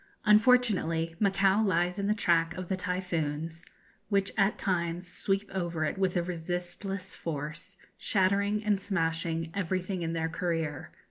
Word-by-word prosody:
Unfortunately 210 Hz, -8 st, +4 dB
Macao 195 Hz, 0 st, +3 dB
lies 180 Hz, -2 st, +1 dB
in 200 Hz, -, 0 dB
the 210 Hz, -, +2 dB
track 165 Hz, -4 st, +2 dB
of 185 Hz, -1 st, -5 dB
the 190 Hz, -, +1 dB
typhoons, 165 Hz, -4 st, -3 dB, 0.4 s
which 200 Hz, -1 st, +2 dB
at 200 Hz, 0 st, +2 dB
times 175 Hz, -1 st, -1 dB
sweep 195 Hz, +2 st, -1 dB
over 170 Hz, -4 st, -1 dB
it 190 Hz, -, -2 dB
with 190 Hz, -1 st, +1 dB
a 175 Hz, -, +1 dB
resistless 180 Hz, +3 st, -4 dB
force, 160 Hz, +4 st, -5 dB, 0.2 s
shattering 200 Hz, +2 st, +1 dB
and 205 Hz, -2 st, +2 dB
smashing 165 Hz, -3 st, -1 dB
everything 185 Hz, -1 st, -2 dB
in 165 Hz, 0 st, -2 dB
their 160 Hz, -1 st, 0 dB
career. 165 Hz, -4 st, -2 dB
180 Hz, 140 wpm, -29 LUFS, 165-195 Hz, 0.4 s, Unfortunately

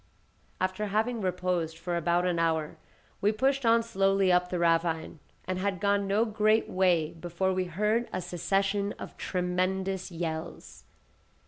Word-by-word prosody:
After 185 Hz, +3 st, -1 dB
having 220 Hz, +3 st, 0 dB
reposed 180 Hz, -3 st, -1 dB
for 175 Hz, +1 st, -3 dB
about 170 Hz, +1 st, +1 dB
an 175 Hz, -2 st, 0 dB
hour, 160 Hz, -2 st, 0 dB, 0.4 s
we 205 Hz, -, +3 dB
pushed 265 Hz, +3 st, +1 dB
on 230 Hz, 0 st, +5 dB
slowly 195 Hz, -3 st, +2 dB
up 180 Hz, 0 st, +3 dB
the 180 Hz, -, -2 dB
ravine, 165 Hz, -1 st, +1 dB, 0.3 s
and 185 Hz, 0 st, -2 dB
had 195 Hz, -1 st, -1 dB
gone 200 Hz, 0 st, +1 dB
no 205 Hz, +4 st, +2 dB
great 215 Hz, 0 st, +2 dB
way 175 Hz, -4 st, +2 dB
before 175 Hz, +3 st, -2 dB
we 185 Hz, 0 st, 0 dB
heard 210 Hz, +7 st, 0 dB
a -, -, -2 dB
succession 195 Hz, +3 st, -1 dB
of -, -, -9 dB
tremendous 185 Hz, +1 st, -1 dB
yells. 165 Hz, -1 st, -6 dB
185 Hz, 145 wpm, -29 LUFS, 175-200 Hz, 0.4 s, on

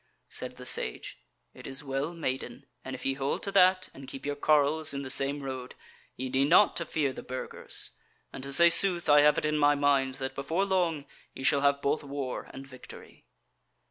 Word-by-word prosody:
Said -, -, -5 dB
the -, -, -10 dB
Sage 60 Hz, -, -2 dB, 0.3 s
"It -, -, -11 dB
is 135 Hz, +1 st, -7 dB
well, 135 Hz, +3 st, -3 dB
maiden, 130 Hz, -6 st, -5 dB, 0.2 s
and 130 Hz, -, -6 dB
if 130 Hz, -, -10 dB
ye 135 Hz, -, +1 dB
hold 135 Hz, +1 st, -3 dB
to 200 Hz, -, -3 dB
that, 185 Hz, -1 st, +4 dB
and 135 Hz, -1 st, -12 dB
keep 135 Hz, +1 st, -9 dB
your 145 Hz, 0 st, -2 dB
carles 150 Hz, 0 st, +2 dB
in 140 Hz, -, -4 dB
the 130 Hz, -, 0 dB
same 140 Hz, +2 st, 0 dB
road, 130 Hz, -2 st, -6 dB, 0.4 s
ye 130 Hz, -, -4 dB
need 135 Hz, +2 st, +1 dB
not 190 Hz, +5 st, +5 dB
to 170 Hz, -, -3 dB
fear 145 Hz, -5 st, -1 dB
the -, -, -8 dB
Burgers: 130 Hz, +1 st, -3 dB, 0.4 s
and -, -, -7 dB
to 135 Hz, +1 st, -6 dB
say 170 Hz, +4 st, +6 dB
sooth, 175 Hz, -1 st, +4 dB
I 145 Hz, -1 st, +6 dB
have 150 Hz, 0 st, +4 dB
it -, -, -1 dB
in 150 Hz, 0 st, 0 dB
my 145 Hz, 0 st, +4 dB
mind, 140 Hz, -2 st, +1 dB
that 130 Hz, 0 st, -5 dB
before 160 Hz, +8 st, -1 dB
long 175 Hz, -6 st, 0 dB, 0.3 s
ye 130 Hz, -, -8 dB
shall 140 Hz, +1 st, +3 dB
have 140 Hz, 0 st, +2 dB
both 150 Hz, +2 st, 0 dB
war 140 Hz, -2 st, -5 dB
and 135 Hz, +1 st, -10 dB
victory." 130 Hz, -2 st, -14 dB
140 Hz, 205 wpm, -28 LUFS, 135-155 Hz, 0.4 s, say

